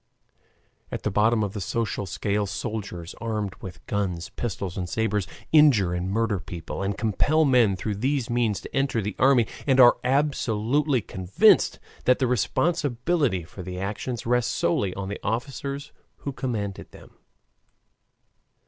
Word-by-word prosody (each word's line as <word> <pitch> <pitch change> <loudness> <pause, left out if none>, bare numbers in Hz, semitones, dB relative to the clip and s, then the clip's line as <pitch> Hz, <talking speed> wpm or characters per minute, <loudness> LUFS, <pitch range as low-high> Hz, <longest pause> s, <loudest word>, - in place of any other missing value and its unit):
At - - -5
the - - 0
bottom 110 +2 +3
of 100 -1 -3
the 105 - -4
social 100 0 -2
scale 100 +2 -1
soldiers, 100 -4 -5
armed 105 -4 -2
with 90 -3 -9
guns, 90 -5 -2
pistols, 100 -6 -4
and 90 -2 -4
sabers, 105 -2 0 0.2
injure 130 - +5
and 90 +1 -2
murder 110 -1 0
people, 85 +1 -6
and 100 0 -2
compel 145 +8 +2
men 120 -7 +4
through 100 +2 -3
these 130 +2 0
means 120 -4 0
to - - -9
enter 135 -3 +1
the 105 -1 -3
army, 130 -3 +5 0.2
and 135 -1 +4
are 120 -1 +7
absolutely 135 0 +1
convinced 95 -1 +3 0.3
that 125 - +5
the 130 - +1
responsibility 130 - +1
for 90 +4 -10
the 90 0 -6
actions 105 +4 -4
rests 125 0 +1
solely 90 +1 0
on 100 -1 -4
the 100 - -5
officers 140 +5 -3 0.3
who 140 - -5
command 110 -7 -2 0.2
them. - - -15
110 Hz, 150 wpm, -25 LUFS, 95-125 Hz, 0.3 s, are